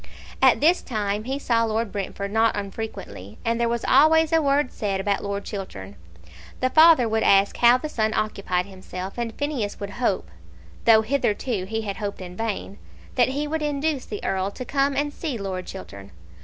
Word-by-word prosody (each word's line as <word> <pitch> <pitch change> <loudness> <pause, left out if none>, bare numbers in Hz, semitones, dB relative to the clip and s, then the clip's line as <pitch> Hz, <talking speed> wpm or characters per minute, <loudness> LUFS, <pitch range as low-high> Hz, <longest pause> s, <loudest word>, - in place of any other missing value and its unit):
At 265 -1 +5
this 340 +4 +4
time 210 -3 -2
he 265 +2 -2
saw 235 -5 +1
Lord 225 -1 -1
Brentford 200 0 -4
not 225 0 +2
unfrequently, 200 - -7
and 230 +1 0
there 235 - +2
was 235 0 -2
always 315 +3 +5
a 325 - +5
word 280 -2 +1
said 200 -2 -2
about 200 +1 -1
Lord 200 0 -3
Chiltern. 100 - -7 0.6
The 255 0 0
father 315 -5 +7
would 220 0 0
ask 195 -1 +4
how 240 +1 +6
the 280 - -5
son 220 -7 0
occupied 195 -4 -1
himself, 190 +1 -8
and 235 -1 -2
Phineas 265 -6 -3
would 200 0 -5
hope, 190 - 0 0.5
though 220 -1 +6
hitherto 220 -4 -1
he 220 +3 -3
had 200 -3 -4
hoped 205 -2 -4
in 180 -1 -8
vain, 210 -1 -4 0.3
that 245 -2 +3
he 280 +3 -2
would 315 +1 -2
induce 295 -1 -1
the 210 - -6
Earl 190 0 0
to 255 +5 -8
come 275 +1 +1
and 290 +1 -1
see 295 -7 -4
Lord 190 -3 -5
Chiltern. 100 - -9
220 Hz, 185 wpm, -24 LUFS, 200-270 Hz, 0.6 s, father